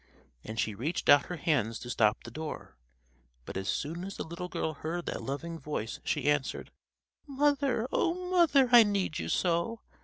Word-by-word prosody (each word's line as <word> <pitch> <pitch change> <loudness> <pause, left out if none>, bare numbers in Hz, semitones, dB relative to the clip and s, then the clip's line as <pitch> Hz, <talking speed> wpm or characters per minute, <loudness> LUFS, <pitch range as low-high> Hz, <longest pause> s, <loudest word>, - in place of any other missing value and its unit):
and 110 +1 -6
she 110 - 0
reached 135 - -3
out 145 0 +7
her 180 - -4
hands 135 -9 0
to - - -9
stop 110 -3 +2
the 120 - -9
door. 155 - -7 0.7
But - - -8
as 95 +1 -3
soon 165 +5 -2
as 195 +1 -6
the - - -3
little 170 +2 -6
girl 160 - -2
heard 165 +4 -4
that - - -4
loving 165 +5 -5
voice 135 -6 -4
she - - -1
answered: 145 -2 0 0.6
"Mother, 280 -3 +1
oh! 360 +1 0
Mother! 310 -7 +5
I 240 -1 +10
need 200 -6 0
you - - -4
so! 175 +6 0
165 Hz, 180 wpm, -30 LUFS, 140-230 Hz, 0.7 s, I